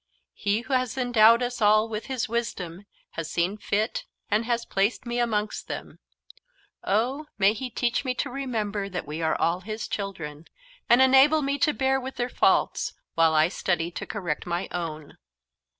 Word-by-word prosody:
He 205 +2 0
who 260 +3 -5
has 255 -1 0
endowed 235 -1 +5
us 245 0 -3
all 215 +1 +4
as 215 - -5
His 260 -4 -2
wisdom 200 -5 -4 0.2
has 165 -1 -5
seen 175 +4 0
fit, 215 +3 -1 0.3
and 215 +2 +2
has 235 0 -1
placed 200 +6 0
me 240 0 -2
amongst 215 -3 -1
them, - - -7 0.8
oh, 255 +9 0
may 200 +1 +4
He 250 +3 -5
teach 245 +1 0
me 255 -2 -1
to - - -2
remember 215 -7 -3
that 180 -2 -4
we 150 +3 -5
are 160 - +1
all 170 +2 +1
His 215 +3 -5
children, 165 -7 -5 0.4
and 245 +2 +7
enable 270 +4 +6
me 280 +1 -1
to 300 - +3
bear 265 -1 +1
with 260 +1 -6
their 245 0 -2
faults, - - +2 0.2
while 165 -1 +3
I 155 +1 +5
study 175 -2 -1
to - - -6
correct 175 -6 -3
my 175 +1 -2
own." 155 -4 -5
215 Hz, 175 wpm, -26 LUFS, 180-245 Hz, 0.8 s, and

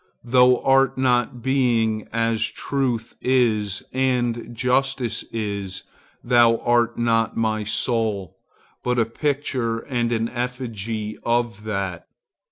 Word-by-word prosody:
Thou 125 +1 +5
art 135 0 +3
not 125 -2 +1
Being, 115 -5 +1
as 115 -1 +1
Truth 125 -5 -2
is, 110 -6 +1
as 125 -2 +1 0.2
Justice 125 0 0
is,—thou 110 +3 0
art 120 0 +1
not 115 -1 +1
my 110 -1 0
soul, 110 -4 -1 0.5
but 125 0 0
a 115 - +3
picture 130 -2 -1
and 120 -2 -1
effigy 115 -4 -4
of 115 -3 -1
that. 95 -5 -3
120 Hz, 100 wpm, -23 LUFS, 110-125 Hz, 0.5 s, Thou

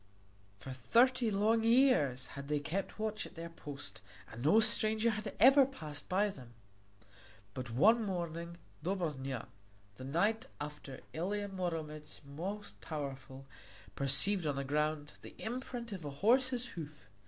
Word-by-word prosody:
For 130 +6 -8
thirty 235 - +3
long 215 +3 +2
years 230 - +4
had 140 0 -7
they 150 0 +1
kept 175 +7 -3
watch 215 0 -2
at - - -17
their 165 0 -7
post 145 -8 -8 0.3
and 120 +3 -7
no 180 +10 +6
stranger 220 0 +3
had 215 0 -5
ever 270 +3 +8
passed 155 - -6
by 200 +3 +2
them. 125 -10 -11 1.0
But 125 -2 -5
one 215 - +5
morning 170 -3 -4 0.3
Dobrnja, 150 - -2 0.5
the 130 - -8
knight 200 +11 +1
after 145 -2 -7
Ilia 200 +5 -2
Muromec 160 -6 -4
most 185 +9 -6
powerful, 135 -3 -6 0.5
perceived 150 +7 +3
on 145 - 0
the 140 - -2
ground 150 +1 -1
the - - -11
imprint 240 0 -5
of 185 -5 -6
a 145 - -4
horse's 245 - +2
hoof. 150 - -9
170 Hz, 140 wpm, -34 LUFS, 140-215 Hz, 1.0 s, ever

